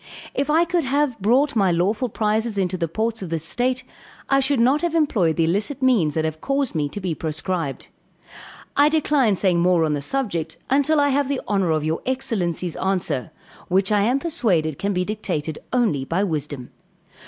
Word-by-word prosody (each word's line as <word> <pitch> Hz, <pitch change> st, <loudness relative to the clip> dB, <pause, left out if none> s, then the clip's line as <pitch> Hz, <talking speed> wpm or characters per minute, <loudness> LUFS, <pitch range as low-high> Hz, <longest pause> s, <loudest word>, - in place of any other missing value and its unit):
If 280 Hz, -, -1 dB
I 325 Hz, +3 st, +4 dB
could 345 Hz, -1 st, 0 dB
have 275 Hz, -3 st, 0 dB
brought 250 Hz, +7 st, +2 dB
my 195 Hz, -4 st, +3 dB
lawful 205 Hz, +9 st, 0 dB
prizes 215 Hz, 0 st, -1 dB
into 185 Hz, -1 st, 0 dB
the 170 Hz, -2 st, -1 dB
ports 220 Hz, +6 st, -2 dB
of 185 Hz, -, -5 dB
this 165 Hz, -2 st, -2 dB
state, 250 Hz, +6 st, -1 dB, 0.5 s
I 275 Hz, -, +4 dB
should 270 Hz, -1 st, +1 dB
not 260 Hz, +6 st, +3 dB
have 340 Hz, -1 st, -1 dB
employed 210 Hz, -, +2 dB
the 165 Hz, -, +2 dB
illicit 205 Hz, -, -1 dB
means 205 Hz, -, +3 dB
that 160 Hz, -1 st, 0 dB
have 155 Hz, 0 st, -4 dB
caused 275 Hz, -1 st, -1 dB
me 150 Hz, -3 st, -1 dB
to 205 Hz, -, -6 dB
be 180 Hz, -4 st, -2 dB
proscribed. 160 Hz, -1 st, -3 dB, 0.9 s
I 290 Hz, +1 st, +5 dB
decline 290 Hz, -8 st, +2 dB
saying 180 Hz, -2 st, +2 dB
more 175 Hz, -1 st, +3 dB
on 155 Hz, -, 0 dB
the 145 Hz, -, -2 dB
subject, 170 Hz, -, -2 dB
until 285 Hz, +3 st, +3 dB
I 285 Hz, 0 st, +3 dB
have 280 Hz, 0 st, +1 dB
the 280 Hz, -2 st, 0 dB
honor 195 Hz, -4 st, +1 dB
of 155 Hz, -1 st, +1 dB
your 160 Hz, +1 st, -1 dB
excellency's 185 Hz, -, -2 dB
answer, 170 Hz, -8 st, -1 dB, 0.4 s
which 190 Hz, +2 st, +2 dB
I 205 Hz, -1 st, +3 dB
am 240 Hz, +6 st, +2 dB
persuaded 200 Hz, -, 0 dB
can 200 Hz, -, -1 dB
be 180 Hz, -1 st, 0 dB
dictated 175 Hz, -8 st, -3 dB
only 220 Hz, -, +1 dB
by 170 Hz, +8 st, -1 dB
wisdom. 150 Hz, -8 st, -4 dB
200 Hz, 190 wpm, -22 LUFS, 165-260 Hz, 0.9 s, I